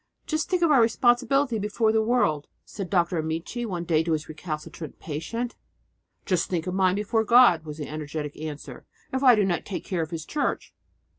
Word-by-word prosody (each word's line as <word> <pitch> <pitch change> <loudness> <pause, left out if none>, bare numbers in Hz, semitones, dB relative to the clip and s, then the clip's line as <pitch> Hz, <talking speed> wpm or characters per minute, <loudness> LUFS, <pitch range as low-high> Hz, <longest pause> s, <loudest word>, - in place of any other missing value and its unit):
"Just 310 +2 -2
think 365 -2 +1
of 330 - +4
our 270 -5 +6
responsibility 240 +2 +2
before 210 +2 +1
the 220 0 +2
world!" 215 -11 +1 0.2
said 195 -4 -6
Dr. 175 -3 +1
Amici 165 +10 -3
one 175 -4 -3
day 165 -2 +2
to 165 0 0
his 155 0 -2
recalcitrant 155 0 -7
patient. 230 +11 -4 0.7
"Just 180 -3 0
think 175 -3 -1
of 180 - -3
mine 185 -1 +2
before 210 +2 0
God," 225 -9 +5
was 150 -1 -7
the 150 - -5
energetic 150 -1 -5
answer, 150 -1 -8 0.3
"if 265 - 0
I 255 -3 +7
do 210 -2 +2
not 175 -3 -1
take 195 - -6
care 180 -3 -2
of 160 - -3
His 160 -2 -5
Church!" 300 - -2
185 Hz, 195 wpm, -26 LUFS, 160-235 Hz, 0.7 s, I